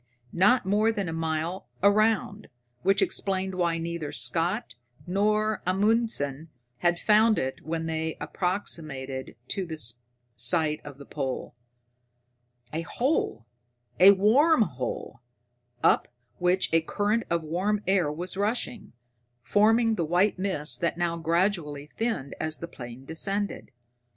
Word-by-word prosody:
Not 205 +6 +4
more 210 +3 +3
than 200 -4 -3
a 165 - -3
mile 165 +3 -2 0.2
around, 215 0 +2 0.3
which 195 +1 +3
explained 190 0 -1
why 170 -2 +1
neither 165 -2 -4
Scott 175 +8 -2 0.3
nor 210 +3 +1
Amundsen 185 - 0 0.3
had 175 0 +2
found 215 +3 +4
it 130 0 -2
when 165 +1 -3
they 160 0 -2
approximated 150 -6 -3
to 190 -2 -2
the 160 -1 -5 0.6
site 150 +6 +1
of 145 -2 -10
the 140 - -11
pole. 135 -3 -4 1.2
A 160 - -1
hole 235 - -1 0.5
a 195 +2 +9
warm 235 - +5
hole, 125 - -5 0.6
up - - +4 0.3
which 180 -1 +1
a 165 - +5
current 205 +7 0
of 170 -1 0
warm 195 +7 -1
air 185 -5 +2
was 175 +5 -5
rushing, 215 +3 -2 0.5
forming 225 +2 +4
the 175 - 0
white 180 +5 +2
mist 185 -6 -1
that 170 0 0
now 175 -1 0
gradually 165 -3 -1
thinned 225 - -2
as 155 0 -2
the 170 - -6
plane 120 -3 -10
descended. 195 +6 -2
180 Hz, 125 wpm, -27 LUFS, 160-205 Hz, 1.2 s, a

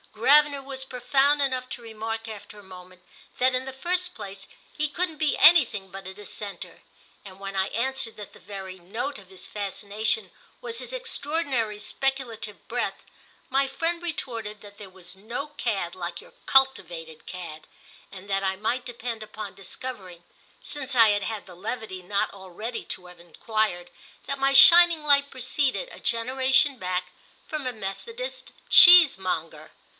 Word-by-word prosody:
Gravener 285 +4 +4
was 265 -1 -5
profound 270 +3 +2
enough 255 -2 0
to 245 - -7
remark 225 0 -5
after 210 -1 -10
a - - -14
moment 185 -1 -14 0.4
that 255 0 +3
in 255 - -1
the 265 - -5
first 360 +5 -1
place 195 0 -9 0.3
he 300 - 0
couldn't 335 0 -2
be 310 -1 +1
anything 270 - +5
but 195 0 -9
a 190 - -7
Dissenter, 205 0 -7 0.4
and 190 -1 -12
when 195 0 -6
I 190 0 +1
answered 260 0 -1
that 210 -2 -10
the - - -16
very 190 -2 -8
note 225 +11 -5
of 190 -2 -17
his 190 -1 -10
fascination 210 - -2 0.3
was 465 -2 -4
his - - -6
extraordinary 285 - -1
speculative 235 -3 -3
breadth - - -3 0.4
my 270 +1 +2
friend 330 +6 -2
retorted 230 -11 -5
that 205 -1 -13
there 200 -2 -9
was 185 0 -12
no 235 +8 -6
cad 200 -11 -3
like 175 -1 -5
your - - -15
cultivated 175 -12 +1
cad, 165 -4 -8 0.4
and 195 +1 -11
that 195 0 0
I 190 0 0
might 245 +5 -2
depend 235 -2 -5
upon 215 0 -8
discovering—since 200 - -7
I 225 -2 +7
had 205 -1 +1
had 220 -1 -5
the 180 - -13
levity 210 0 -5
not 200 +3 -1
already 200 +5 -7
to 180 - -5
have 180 0 -14
enquired—that 175 - -4
my 275 0 +3
shining 340 +2 +8
light 280 -1 +4
proceeded, 265 - -1
a - - -11
generation 260 +4 +2
back, 180 -1 -3 0.4
from 305 -3 -4
a - - 0
Methodist 460 - -6 0.2
cheesemonger. 190 - +6
225 Hz, 155 wpm, -25 LUFS, 195-275 Hz, 0.4 s, shining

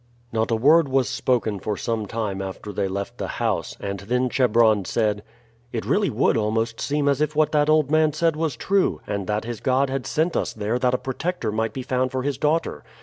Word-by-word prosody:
Not 110 0 0
a 115 - +2
word 145 +6 +4
was 130 -1 +2
spoken 125 -6 0
for 105 +1 -3
some 115 -3 -2
time 105 -3 -3
after 95 +2 -6
they 95 - -1
left 100 +1 -5
the - - -2
house, - - -1
and 100 -1 -4
then 125 +6 0
Chebron 115 -5 +3
said: 105 +1 0 0.5
"It 115 - -3
really 205 -1 +2
would - - +2
almost 110 +1 -1
seem 145 0 0
as 140 0 +2
if 150 0 0
what 155 0 +3
that 150 -1 +2
old 155 -2 +3
man 155 -1 +4
said 160 +1 +1
was 155 -3 -1
true, 195 -1 +1
and 100 -2 -3
that 105 +1 -1
his 120 -2 -5
God 130 +1 +1
had 135 -2 -3
sent 160 +2 0
us - - -1
there 110 +3 -2
that 125 0 +2
a - - +1
protector 135 -2 -3
might 110 +1 -1
be 130 - -5
found 130 0 0
for 130 -1 -2
his 140 -1 -2
daughter. 155 +2 0
125 Hz, 220 wpm, -23 LUFS, 110-150 Hz, 0.5 s, word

